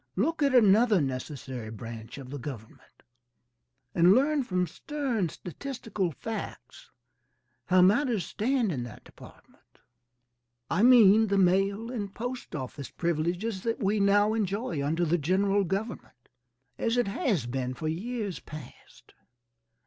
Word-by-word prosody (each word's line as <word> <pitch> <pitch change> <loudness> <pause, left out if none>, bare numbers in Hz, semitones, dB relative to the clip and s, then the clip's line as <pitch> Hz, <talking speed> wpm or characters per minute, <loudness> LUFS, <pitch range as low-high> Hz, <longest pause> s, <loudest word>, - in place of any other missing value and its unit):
Look 310 - 0
at 280 -2 +3
another 215 -1 +5
necessary 130 -3 -4
branch 115 +1 -8
of 135 0 -7
government, 120 -5 -10 0.9
and 175 +3 +6
learn 285 +3 +3
from 180 -6 0
stern 240 - -2
statistical 215 - -4
facts 220 +9 -7 0.8
how 185 0 +5
matters 220 +1 +3
stand 240 -2 0
in 135 -6 -3
that 120 -3 -9
department, - - -18 0.9
I 180 - +2
mean 225 -3 +7
the 200 0 +1
mail 195 +5 +2
and 205 -6 -4
post 245 -3 -6
office 135 0 -6
privileges 175 +5 -2
that 230 +2 -1
we 205 +2 +1
now 205 +2 +4
enjoy 200 - -2
under 165 +4 0
the 170 +2 +1
General 195 +6 +2
Government, 195 - -5 0.5
as 230 +1 0
it 245 - +2
has 200 - 0
been 125 +1 -3
for 155 +5 -4
years 200 - -3
past. 150 -2 -13
195 Hz, 125 wpm, -28 LUFS, 155-225 Hz, 0.9 s, mean